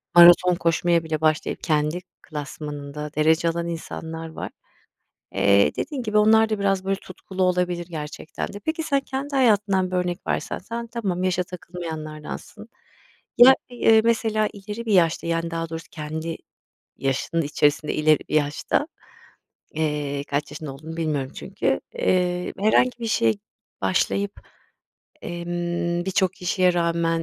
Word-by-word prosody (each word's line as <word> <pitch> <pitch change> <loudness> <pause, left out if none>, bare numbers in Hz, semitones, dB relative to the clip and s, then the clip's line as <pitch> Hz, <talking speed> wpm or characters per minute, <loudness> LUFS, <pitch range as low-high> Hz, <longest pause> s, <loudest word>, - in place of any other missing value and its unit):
maraton 175 +1 +8
koşmaya 170 0 +2
bile 155 -1 -3
başlayıp 155 -1 0
kendi 155 +1 +1 0.2
klasmanında 150 0 -6
derece 160 +2 +3
alan 170 +1 -2
insanlar 165 -1 -6
var. 160 - -6 0.8
Eee, 100 +1 +4
dediğin 285 -5 -3
gibi 215 -2 +1
onlar 220 +1 +5
da 215 - 0
biraz 195 -1 +1
böyle 195 0 0
tutkulu 190 0 -6
olabilir 180 -1 +1
gerçekten 155 -2 -6
de. 205 - -9
Peki 315 +1 -1
sen 280 -3 +1
kendi 275 +1 -4
hayatından 205 -7 +3
bir 185 - -1
örnek 180 -1 -2
versen, - - -2
sen 235 +4 -6
tamam, 210 -6 -2
yaşa 185 0 +1
takılmayanlardansın. 160 -4 -7 0.7
Ya, 255 +2 +10 0.2
eee, 225 -2 +5
mesela 220 -2 +2
ileri 210 +3 -7
bir 220 - +1
yaşta, 170 -3 +3
yani 165 0 -1
daha 165 0 -3
doğrusu 165 0 -6
kendi 160 +1 -5 0.6
yaşının 135 +5 0
içerisinde 150 0 +1
ileri 155 0 +4
yaşta, 155 - +1 0.9
eee, 150 -2 -1
kaç 145 0 -2
yaşında 150 -3 -6
olduğunu 160 +4 -9
bilmiyorum 150 -5 -1
çünkü, - - -1
eee, 180 -1 +1
herhangi 245 +4 +3
bir 230 - -2
şeye 115 - +2 0.5
başlayıp, 100 +1 +1 0.9
emm, 175 0 -2
birçok 190 -1 +2
kişiye 180 0 +2
rağmen, 170 -1 +1
170 Hz, 135 wpm, -24 LUFS, 155-195 Hz, 0.9 s, Ya